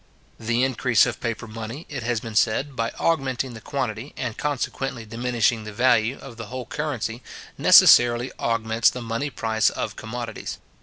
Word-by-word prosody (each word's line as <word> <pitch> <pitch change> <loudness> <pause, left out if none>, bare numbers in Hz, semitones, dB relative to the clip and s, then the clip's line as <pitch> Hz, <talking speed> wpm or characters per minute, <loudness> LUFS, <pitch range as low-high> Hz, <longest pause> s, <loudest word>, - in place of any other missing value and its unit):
The 115 +2 0
increase 125 -3 +3
of - - -4
paper 115 0 -3
money, 115 +7 -7
it 140 -4 -5
has 120 0 -1
been 115 0 -8
said, 130 +6 +1
by 115 -1 -1
augmenting 135 -6 0
the 110 - -10
quantity, 125 -1 -4
and 120 -4 -3
consequently 135 -4 -3
diminishing 115 0 0
the 105 - -7
value, 120 +2 +2
of 120 -4 -11
the 115 -2 -7
whole 125 +2 -6
currency, 120 -4 -3 0.3
necessarily 120 +1 +6
augments 115 -1 +2
the 125 - -7
money 115 +5 -2
price 110 -5 +1
of - - -4
commodities. 115 -1 -6
120 Hz, 160 wpm, -24 LUFS, 115-130 Hz, 0.3 s, necessarily